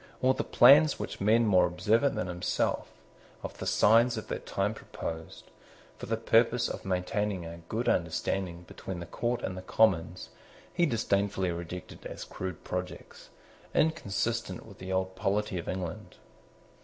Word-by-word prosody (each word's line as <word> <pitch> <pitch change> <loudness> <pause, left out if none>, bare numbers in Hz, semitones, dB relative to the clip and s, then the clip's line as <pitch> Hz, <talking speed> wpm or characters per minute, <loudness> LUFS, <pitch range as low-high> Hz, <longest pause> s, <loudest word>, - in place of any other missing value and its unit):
All 130 +1 +4
the - - -2
plans 145 +4 +6
which - - -6
men 110 +3 +4
more 95 -4 +5
observant 105 +10 +2
than - - -1
himself 90 0 -1 0.6
of - - -7
the - - -4
signs 115 +3 +4
of 110 - -6
that - - -5
time 100 +2 0
proposed, 80 -6 -7 0.5
for - - -7
the 115 +1 0
purpose 115 +2 +3
of - - -6
maintaining 95 0 -1
a 85 +1 -8
good 115 +3 -2
understanding 85 +1 -1
between 90 +1 -7
the 85 - -6
Court 120 +7 -2
and 95 - -3
the 95 - -6
Commons, 90 -3 +1 0.4
he 175 -1 +3
disdainfully 100 -6 0
rejected 85 +1 -7
as - - -7
crude 95 -3 -6
projects, 90 0 -6 0.5
inconsistent 115 - 0
with 100 -4 -14
the 95 0 -6
old 95 0 -1
polity 95 0 -1
of 85 - -6
England. 90 +1 -5
95 Hz, 155 wpm, -29 LUFS, 90-115 Hz, 0.6 s, plans